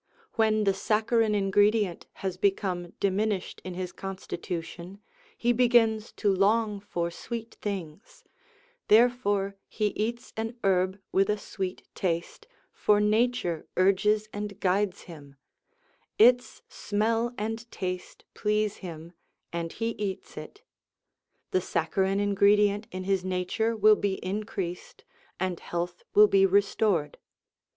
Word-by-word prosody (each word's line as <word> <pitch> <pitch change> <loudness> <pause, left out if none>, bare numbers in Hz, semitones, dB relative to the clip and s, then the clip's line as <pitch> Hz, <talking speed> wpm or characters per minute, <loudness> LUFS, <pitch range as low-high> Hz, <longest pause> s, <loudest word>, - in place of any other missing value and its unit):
When 215 -2 +2
the 195 -1 +3
saccharine 215 +2 +1
ingredient 205 -1 +2 0.2
has 190 -2 -1
become 185 -2 -1
diminished 200 0 -1
in 185 -1 -6
his 180 -1 -4
constitution, 185 -1 -6 0.4
he 240 +1 +2
begins 230 -3 +3
to 205 -2 +1
long 210 +2 +2
for 170 -4 -3
sweet 230 +5 -6
things; 190 -4 -6 0.6
therefore 205 -4 +3
he 210 -1 -1
eats 235 +4 -4
an 225 +2 -4
herb 190 0 +2
with 195 +1 +2
a 210 - +2
sweet 190 -2 -5
taste, 175 - -3 0.3
for 210 -1 +3
nature 210 -5 +1
urges 210 +3 +3
and 205 -1 -5
guides 195 +1 +1
him; 145 -5 -12 0.8
its 245 +2 +4
smell 225 +3 -1
and 225 +2 -4
taste 180 -3 -5
please 210 0 0
him, 170 -2 -9 0.4
and 170 -1 -3
he 225 +1 -2
eats 205 -4 -5
it. - - -10 0.9
The 185 - +2
saccharine 190 +3 0
ingredient 205 +1 +3
in 185 0 -5
his 190 -1 0
nature 185 +5 -1
will 215 0 +6
be 200 -2 0
increased, 190 -3 -4 0.4
and 185 -1 -2
health 175 0 -4
will 210 - +9
be 195 -1 +4
restored. 195 -5 +1
200 Hz, 120 wpm, -28 LUFS, 185-215 Hz, 0.9 s, will